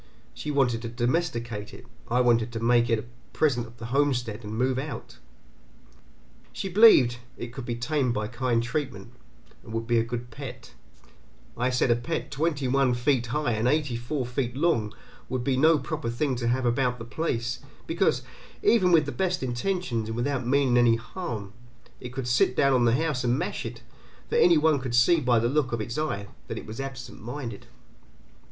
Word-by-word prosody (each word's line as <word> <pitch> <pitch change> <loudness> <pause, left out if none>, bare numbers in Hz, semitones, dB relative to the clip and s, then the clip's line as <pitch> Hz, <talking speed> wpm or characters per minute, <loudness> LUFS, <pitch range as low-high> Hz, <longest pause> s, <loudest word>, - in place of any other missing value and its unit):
She 150 - -6
wanted 125 -5 +1
to 115 - -4
domesticate 120 -4 -2
it, - - -13 0.2
I 125 +2 +3
wanted 120 -1 +3
to 115 - -3
make 120 0 +3
it 115 - +3
a 110 - -6 0.3
present 125 -7 +1
of 115 +1 -16
the 115 - -7
homestead 125 -6 0
and 105 +1 -5
move 130 +1 +1
out. 135 -4 -7 1.3
She 195 - -4
believed 175 - +6 0.2
it 120 0 -7
could 130 -2 -7
be 120 - -1
tamed 125 +2 0
by 105 -2 -2
kind 120 -1 0
treatment 120 -4 -4 0.5
and 110 - -12
would 115 0 -2
be 120 0 +2
a - - +2
good 120 +1 -5
pet; 125 -1 -9 0.8
I 125 +2 0
said 125 -1 +2
a - - +5
pet 155 +8 -4
twenty 145 -2 -1
one 130 -1 +2
feet 125 -1 +1
high 145 +2 0
and 110 +1 0
eighty 145 -2 +1
four 125 +3 -3
feet 125 0 -3
long 140 -10 +1 0.4
would 130 -1 -2
be 135 0 +1
no 155 +4 +5
proper 150 -2 -4
thing 130 +3 -1
to 120 -1 -2
have 125 +2 +1
about 125 +1 +1
the 115 - -8
place, 120 -3 -2 0.3
because, 165 -7 +1 0.4
even 190 -6 +4
with 160 -3 +5
the 145 - -3
best 185 -3 -1
intentions 120 - -2
and 110 - -3
without 130 0 -1
meaning 130 -2 +3
any 120 -1 +5
harm, 115 - -6 0.5
it 125 - -7
could 125 0 -4
sit 125 +1 +3
down 140 +1 +4
on 125 -2 +3
the 115 0 +4
house 150 -3 0
and 120 +1 +2
mash - - -3
it, - - -9 0.5
for - - -1
any 170 -2 +6
one 155 -1 +3
could 125 -2 -3
see 140 +8 +5
by 125 -4 +2
the 115 +1 +2
look 135 +1 +1
of 120 - -1
its 115 +2 -4
eye 100 -11 -2 0.2
that - - -5
it - - -7
was 110 +4 -6
absent 130 -3 -7
minded. 120 -2 -6
125 Hz, 195 wpm, -26 LUFS, 120-145 Hz, 1.3 s, believed